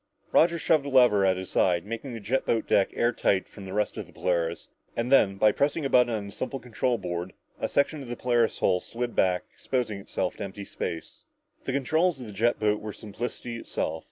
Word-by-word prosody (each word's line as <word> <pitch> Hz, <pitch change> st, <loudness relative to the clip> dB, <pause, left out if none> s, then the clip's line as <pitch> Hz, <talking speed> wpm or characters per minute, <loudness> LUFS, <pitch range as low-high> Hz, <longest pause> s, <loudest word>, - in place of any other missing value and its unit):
Roger 170 Hz, +1 st, +4 dB
shoved 155 Hz, -2 st, +2 dB
a 140 Hz, -, -4 dB
lever 125 Hz, -7 st, +5 dB
at 95 Hz, -1 st, +3 dB
his 95 Hz, 0 st, -6 dB
side, 90 Hz, -2 st, +2 dB
making 115 Hz, +5 st, -5 dB
the 115 Hz, -, -5 dB
jet 115 Hz, +6 st, 0 dB
boat 115 Hz, -, 0 dB
deck 100 Hz, -, +3 dB
airtight 120 Hz, -5 st, +1 dB
from 100 Hz, -, -11 dB
the 95 Hz, -, -7 dB
rest 105 Hz, +2 st, -1 dB
of -, -, -5 dB
the -, -, -17 dB
Polaris, 85 Hz, -2 st, -1 dB, 0.3 s
and 115 Hz, +2 st, -1 dB
then, 100 Hz, -8 st, +5 dB
by 105 Hz, +2 st, +4 dB
pressing 145 Hz, +5 st, 0 dB
a 135 Hz, -, -1 dB
button 125 Hz, -1 st, +5 dB
on 105 Hz, -3 st, -2 dB
the 100 Hz, -, -8 dB
simple 135 Hz, +5 st, -4 dB
control 125 Hz, 0 st, -1 dB
board, 90 Hz, -2 st, -4 dB, 0.3 s
a -, -, -1 dB
section 140 Hz, +1 st, +1 dB
of 130 Hz, -, -9 dB
the 120 Hz, -, -3 dB
Polaris' 120 Hz, -2 st, +1 dB
hull 90 Hz, -1 st, +2 dB
slipped 120 Hz, +5 st, -4 dB
back, 90 Hz, -1 st, +2 dB
exposing 120 Hz, -6 st, -2 dB
them 100 Hz, -, -13 dB, 0.2 s
to -, -, -7 dB
empty 100 Hz, +1 st, -7 dB
space. 85 Hz, -3 st, -6 dB, 0.4 s
The 135 Hz, -, -2 dB
controls 155 Hz, +4 st, +1 dB
of 125 Hz, -, -7 dB
a -, -, -8 dB
jet 115 Hz, +4 st, +1 dB
boat 105 Hz, 0 st, +1 dB
were 105 Hz, -1 st, -6 dB
simplicity 115 Hz, +2 st, -6 dB
itself. 80 Hz, -7 st, -3 dB
115 Hz, 220 wpm, -27 LUFS, 95-125 Hz, 0.4 s, lever